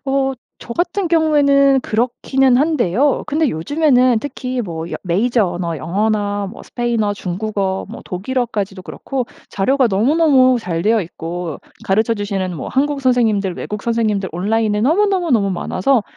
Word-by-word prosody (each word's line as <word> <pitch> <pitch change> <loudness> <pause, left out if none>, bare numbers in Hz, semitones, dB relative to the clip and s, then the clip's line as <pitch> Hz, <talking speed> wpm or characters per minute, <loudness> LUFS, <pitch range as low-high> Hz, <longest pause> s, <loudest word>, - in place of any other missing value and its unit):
어. 270 0 +1 0.3
저 235 - -8
같은 355 +5 -1
경우에는 280 -4 +4
그렇기는 250 +3 +1
한데요. 285 - +1
근데 310 -1 +1
요즘에는 255 - +2
특히 255 -3 -4
뭐 165 -3 -6
여 - - -3
메이저 210 +5 +1
언어, 175 -2 -3
영어나 205 +4 -1
뭐 230 - -11
스페인어, 235 -4 -1
중국어, 195 0 -3
뭐 235 - -8
독일어까지도 205 -1 -3
그렇고 260 +5 -4 0.2
자료가 260 +6 +2
너무너무 255 +4 +4
잘 170 -6 -3
되어 215 +2 +2
있고 165 -1 -6 0.3
가르쳐 220 +4 +2
주시는 195 -4 -3
뭐 - - -5
한국 280 +1 0
선생님들, 220 -7 +2
외국 210 0 -6
선생님들 215 -5 0
온라인에 210 +3 0
너무너무너무 330 - +2
많아서 200 +6 0
230 Hz, 355 characters per minute, -18 LUFS, 195-270 Hz, 0.3 s, 경우에는